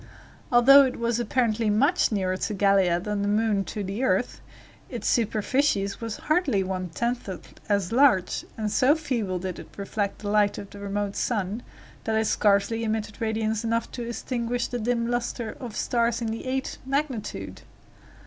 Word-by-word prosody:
Although 260 +3 +8
it 260 - -3
was 235 0 0
apparently 230 -2 +1
much 230 +7 +3
nearer 190 -3 0
to 210 +3 -3
Gallia 195 -3 +3
than 205 +2 -2
the 200 - 0
moon 210 -1 +2
to 210 - -4
the 200 +6 -3
earth, 260 - 0 0.5
its - - -4
superficies 220 -2 +1
was 225 -2 -4
hardly 300 - +1
one 185 -1 -3
tenth 235 +5 -2 0.4
as 200 -3 +1
large, 235 -8 +3
and 215 -2 -2
so 260 +7 +4
feebly 235 - -2
did 180 0 -5
it - - -10
reflect 200 0 -2
the 205 - -2
light 205 -1 +3
of 200 - -8
the 200 - -10
remote 200 0 -3
sun, 210 -1 -1 0.4
that 220 - 0
it 220 0 +2
scarcely 205 +2 +2
emitted 215 0 -3
radiance 220 0 -1
enough 230 0 -1
to 245 - -6
extinguish 240 0 -2
the 245 - -4
dim 235 +1 0
luster 240 -1 -2
of 235 -5 -7
stars 235 -1 +1
of 230 -2 -2
the 225 +3 -5
eighth 265 +1 -2
magnitude. 265 -4 -3
220 Hz, 170 wpm, -26 LUFS, 200-240 Hz, 0.5 s, Although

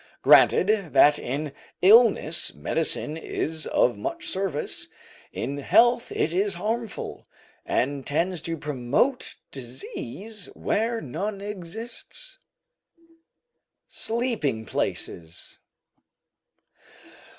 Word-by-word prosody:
Granted 195 -4 +5
that 145 0 +6
in 140 +3 -3 0.3
illness 205 -6 +5
medicine 155 -1 -1
is 160 -1 -3
of 120 -5 +2
much - - -4
service, 190 -6 -2 0.4
in 140 +4 -4
health 240 - +4
it 160 - 0
is 195 +1 +1
harmful, 220 +4 -4 0.4
and 140 +1 0
tends 170 +5 -1
to 165 -1 -3
promote 145 - 0 0.2
disease 135 - -6
where 230 +2 0
none 195 +9 -4
exists. 220 - -8 1.5
SLEEPING 220 - -1
PLACES. 80 -5 -4
175 Hz, 85 wpm, -25 LUFS, 145-220 Hz, 1.5 s, that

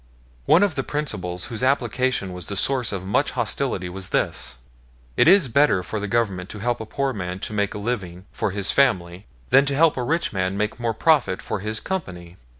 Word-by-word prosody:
One 170 +5 +6
of 200 -5 +2
the 135 - -1
principles 90 - -3
whose 110 - -3
application 125 -5 0
was 90 -1 -7
the 100 - -4
source 125 +3 +1
of 95 -2 -4
much 100 - +1
hostility 90 - -1
was 95 +1 -6
this: 60 - -1 0.6
It - - +4
is 190 -7 +6
better 125 -7 +3
for 95 +5 -4
the 105 - -3
Government 100 -5 -1
to - - -7
help 120 +2 -1
a 110 - -7
poor 135 +3 -1
man 90 -3 -4
to - - -5
make 100 -1 -1
a - - -3
living 100 -5 -4
for - - -1
his 100 0 0
family 95 -8 +1 0.2
than 135 - +6
to 140 - 0
help 160 0 +4
a 125 - -1
rich 165 +4 -1
man 95 0 -1
make 105 +3 -2
more 115 -2 -1
profit 140 - +3
for - - -4
his 110 +2 -3
company. 90 - -5
105 Hz, 210 wpm, -23 LUFS, 95-135 Hz, 0.6 s, One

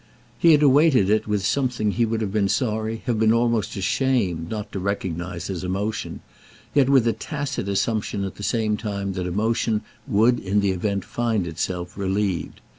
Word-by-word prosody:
He 165 -1 +6
had 150 0 +4
awaited 135 - +5
it 110 0 +2
with 105 -2 0
something 125 -6 0
he 115 +3 +1
would 115 0 -1
have 100 -3 -2
been 100 -2 +2
sorry, 110 -1 -1
have 120 -4 0
been 110 0 +4
almost 115 -2 +1
ashamed 95 -6 0
not 105 -2 -5
to 95 - -4
recognise 90 -2 -3
as 95 -2 -4
emotion, 100 +4 -3 0.5
yet 140 -3 +4
with 130 -4 +4
a 115 - +3
tacit 140 - -4
assumption 100 0 -1
at 95 - -4
the - - -12
same 110 0 0
time 100 -3 -3
that 90 -1 -3
emotion 110 +3 0 0.2
would 120 +1 +3
in 100 +2 0
the 100 -1 +2
event 100 +1 -2
find 115 -5 -1
itself 85 +1 -4
relieved. 95 -1 -2
105 Hz, 180 wpm, -23 LUFS, 95-115 Hz, 0.5 s, He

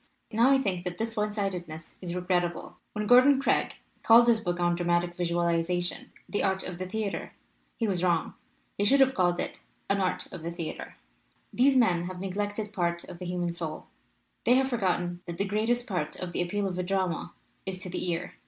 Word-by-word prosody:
"Now 230 +3 +4
I 275 - +6
think 190 -9 -1
that 180 -1 -4
this 225 0 -2
one 210 -1 0
sidedness 180 -6 -4
is 175 -2 -4
re 180 - -3
grettable. 175 -1 -1 0.2
When 210 0 -2
Gordon 255 +4 +7
Craig 275 - +1 0.3
called 235 +1 +7
his 230 -2 +5
book 175 -4 -2
on 175 0 +2
dramatic 175 0 +1
visualization 175 0 0 0.2
The 205 - -1
Art 190 -1 0
of 180 -1 -6
the 185 - -3
Theater 205 +1 -3 0.4
he 230 - 0
was 185 -3 0
wrong. 170 -3 +1 0.5
He - - +3
should 270 +7 +5
have 265 -1 +5
called 175 -5 +2
it - - -3 0.3
'An 200 0 +2
Art 185 - 0
of 185 - -7
the 165 - -4
Theater/ 170 -2 -6 0.6
"These 265 +2 +4
men 180 -8 +3
have 180 0 -6
neglected 205 +2 -3
part 170 -3 0
of 170 - -10
the 180 - -6
human 175 -1 -1
soul. 165 -2 -5 0.5
They 245 - +5
have 265 0 +3
forgotten 180 -6 -1
that 170 0 -5
the 200 - 0
greatest 225 +4 0
part 180 - -2
of 180 -1 -5
the 175 - -1
appeal 195 +3 -1
of 185 -1 -4
a - - 0
drama 185 -2 -1 0.3
is 190 -1 -3
to 185 - -5
the 180 - -2
ear. 170 +1 -3
185 Hz, 205 wpm, -28 LUFS, 175-210 Hz, 0.6 s, Gordon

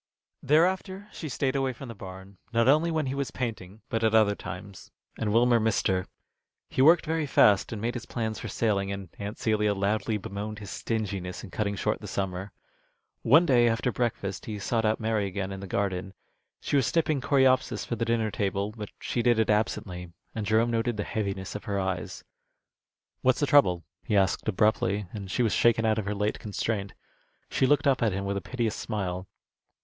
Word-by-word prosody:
Thereafter 185 +6 +1
she 155 - -6
stayed 130 0 -1
away 135 -1 0
from 130 +3 -9
the 115 - -7
barn, 95 -1 -11
not 115 0 +2
only 155 +5 +4
when 160 -3 0
he 130 - -2
was 140 -1 -2
painting, 110 -5 -5
but 115 -2 -2
at 110 0 +3
other 110 -2 +5
times, 100 0 -9 0.3
and 105 -2 -2
Wilmer 120 +1 +4
missed 110 0 +1
her. 95 -1 0 0.6
He - - 0
worked 165 +5 +6
very 160 -1 -1
fast, 105 -7 +4
and 110 - -4
made 115 +3 -1
his 115 -3 -6
plans 110 -2 -3
for - - -5
sailing, 100 -2 0
and 100 -3 -6
Aunt 100 +2 -5
Celia 105 -2 +1
loudly 105 +2 0
bemoaned 105 +2 -5
his 100 -2 -8
stinginess 100 -5 -3
in 100 - -10
cutting 100 -1 -1
short - - -1
the - - -7
summer. 95 0 -3 0.7
One 160 +9 +6
day, 120 -6 +5
after 115 +2 0
breakfast, 110 -6 -2
he 110 -2 -4
sought 110 +2 0
out 110 +1 +2
Mary 110 -2 0
again 95 0 -4
in 95 - -6
the 100 - -7
garden. 95 0 -2 0.5
She - - -1
was 135 -4 +3
snipping 155 -4 +1
Coreopsis 130 -4 +2
for 120 - -2
the 115 - -2
dinner 115 -2 0
table, 100 0 -1
but 105 -2 -6
she 120 - -1
did 120 -1 +3
it 110 -1 +3
absently, 100 -5 -1 0.2
and 105 -2 -3
Jerome 110 +2 +3
noted 115 0 0
the 105 - -1
heaviness 100 -3 -3
of 105 - -7
her 100 -1 -1
eyes. 95 -1 -3 1.0
"What's 130 -1 +3
the 145 - +2
trouble?" 90 -13 +4 0.2
he 105 - +1
asked, 95 +2 +1
abruptly, 105 -1 +1
and 100 -3 -6
she 120 +6 +1
was 110 - +1
shaken 115 -1 +3
out 110 0 +2
of 105 - -3
her 105 +1 -2
late 105 +1 -1
constraint. 105 -1 -3 0.6
She 130 - +2
looked 145 +1 +3
up 135 -3 +3
at 110 -4 +2
him 100 +1 -3
with 100 0 -1
a - - -3
piteous 120 -2 -2
smile. 95 -4 -3
110 Hz, 200 wpm, -28 LUFS, 100-120 Hz, 1.0 s, worked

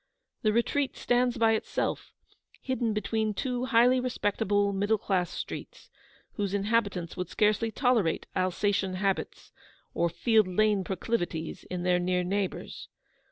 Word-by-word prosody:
The 215 - +2
retreat 260 +5 0
stands 245 0 +1
by 225 -1 +4
itself, 220 - -2 0.5
hidden 255 -3 -1
between 215 0 -1
two 250 0 -2
highly 250 0 +4
respectable 205 -4 0
middle 205 +3 +1
class 185 -4 0
streets, - - -7 0.5
whose 200 -2 -1
inhabitants 200 -4 0
would 180 -1 -4
scarcely 215 +1 +2
tolerate 225 - +1
Alsatian 185 +1 0
habits 195 0 -2 0.4
or 170 0 +1
Field 215 +4 +3
Lane 205 +1 +2
proclivities 175 -4 -3
in 180 -1 -4
their 180 0 +3
near 180 0 0
neighbours. 195 +1 -3
205 Hz, 125 wpm, -28 LUFS, 185-230 Hz, 0.5 s, by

